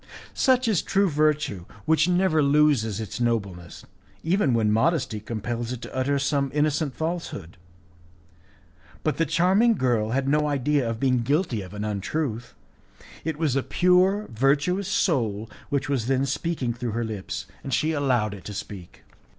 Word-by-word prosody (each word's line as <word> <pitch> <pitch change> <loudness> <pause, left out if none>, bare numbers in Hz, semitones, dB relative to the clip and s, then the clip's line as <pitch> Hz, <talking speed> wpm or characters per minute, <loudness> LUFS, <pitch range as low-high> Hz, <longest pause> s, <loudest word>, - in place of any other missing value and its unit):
Such 255 -2 +2
is 205 -8 +2
true 200 +1 +2
virtue, 150 - 0 0.2
which 160 +1 +3
never 180 -3 +3
loses 140 -7 +3
its 110 +1 -5
nobleness, 100 -8 -2 0.4
even 165 - +2
when 110 -2 +2
modesty 115 -1 +1
compels 115 +2 -4
it 125 - -4
to - - -9
utter 135 +2 +1
some 140 0 0
innocent 150 -1 0
falsehood. 160 - -4 1.5
But 155 - 0
the 165 - +1
charming 190 +9 +3
girl 120 - +1
had 135 +3 0
no 150 +1 +2
idea 145 -2 +1
of 115 -1 -4
being 130 -1 +2
guilty 140 - 0
of 95 +2 -10
an 105 - -4
untruth. 115 +3 -3 0.7
It 160 -2 -3
was 155 -5 0
a 135 - +2
pure, 185 +6 +3
virtuous 140 - +1
soul 115 - 0 0.2
which 140 -1 -1
was 130 -5 -1
then 135 0 +2
speaking 140 -3 -2
through 120 -2 -4
her 120 +1 -1
lips, 105 -4 -5 0.2
and 135 - -5
she 155 +5 +1
allowed 125 -8 +1
it 100 -3 -10
to 105 - -6
speak. 95 -3 -9
135 Hz, 160 wpm, -25 LUFS, 115-160 Hz, 1.5 s, which